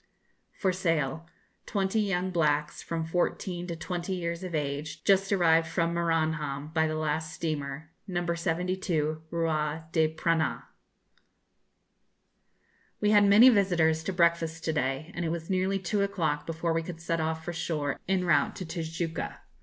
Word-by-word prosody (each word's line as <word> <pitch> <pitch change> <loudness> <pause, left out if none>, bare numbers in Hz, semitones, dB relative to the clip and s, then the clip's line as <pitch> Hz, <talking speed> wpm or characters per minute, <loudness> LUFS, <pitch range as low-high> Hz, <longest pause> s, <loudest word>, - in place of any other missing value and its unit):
FOR 190 -2 0
SALE. 165 -4 -1 0.4
20 195 +1 0
young 185 -2 0
blacks 150 -3 +1
from 165 -1 -3
14 175 +1 -1
to 170 - -3
20 175 +3 -4
years 170 0 -3
of 180 -3 -4
age 145 0 -3
just 195 0 +3
arrived 165 -4 +4
from 170 0 0
Maranham 155 -4 0
by 160 -1 +3
the 155 - -2
last 155 0 -1
steamer; 155 -1 -4 0.2
No. 175 -2 -2
72 170 -2 -1
rua 160 -1 -1
da 160 -2 +3
Prainha. 165 0 0 2.4
We 210 0 +2
had 205 -1 +6
many 210 +6 +8
visitors 170 -7 +3
to 195 - -1
breakfast 170 -2 +1
to 160 - 0
day, 135 +1 -1
and 175 - -3
it 165 - -1
was 165 +2 -4
nearly 190 +1 +1
two 195 +2 -1
o'clock 165 -7 -1
before 165 0 -1
we 165 - +1
could 165 0 -7
set 165 0 -1
off 160 0 -2
for 175 - -2
the 170 - -6
shore 150 -5 -2
en 190 -1 +2
route 170 - +3
to 185 - -5
Tijuca. 165 0 -4
165 Hz, 155 wpm, -29 LUFS, 160-180 Hz, 2.4 s, many